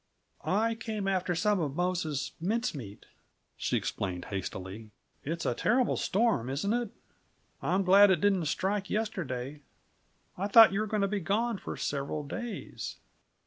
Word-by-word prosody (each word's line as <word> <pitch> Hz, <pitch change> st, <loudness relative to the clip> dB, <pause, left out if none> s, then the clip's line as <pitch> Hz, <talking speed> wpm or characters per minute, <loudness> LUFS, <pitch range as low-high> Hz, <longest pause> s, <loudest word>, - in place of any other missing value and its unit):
"I 225 Hz, +4 st, +1 dB
came 220 Hz, -3 st, -4 dB
after 185 Hz, -2 st, 0 dB
some 205 Hz, +3 st, +2 dB
of 145 Hz, -4 st, -2 dB
Mose's 175 Hz, -5 st, -1 dB
mince 230 Hz, +7 st, 0 dB
meat," 105 Hz, -9 st, -9 dB, 0.5 s
she -, -, 0 dB
explained 90 Hz, -3 st, -3 dB
hastily. 95 Hz, +2 st, -6 dB, 0.3 s
"It's 165 Hz, +4 st, -3 dB
a -, -, +2 dB
terrible 245 Hz, +2 st, +2 dB
storm, 200 Hz, -, +1 dB
isn't 155 Hz, +11 st, 0 dB
it? 240 Hz, -2 st, -1 dB, 0.7 s
I'm 190 Hz, +2 st, +1 dB
glad 200 Hz, +2 st, +7 dB
it 185 Hz, -3 st, +3 dB
didn't 195 Hz, -4 st, +2 dB
strike 195 Hz, +6 st, -1 dB
yesterday. 150 Hz, -, -3 dB, 0.8 s
I 195 Hz, -, 0 dB
thought 220 Hz, 0 st, +8 dB
you 195 Hz, -, 0 dB
were 215 Hz, -, 0 dB
going 215 Hz, 0 st, 0 dB
to -, -, +3 dB
be 205 Hz, +1 st, -1 dB
gone 210 Hz, +4 st, 0 dB
for -, -, -6 dB
several 140 Hz, +1 st, -2 dB
days." 225 Hz, +10 st, -6 dB
190 Hz, 150 wpm, -30 LUFS, 145-210 Hz, 0.8 s, thought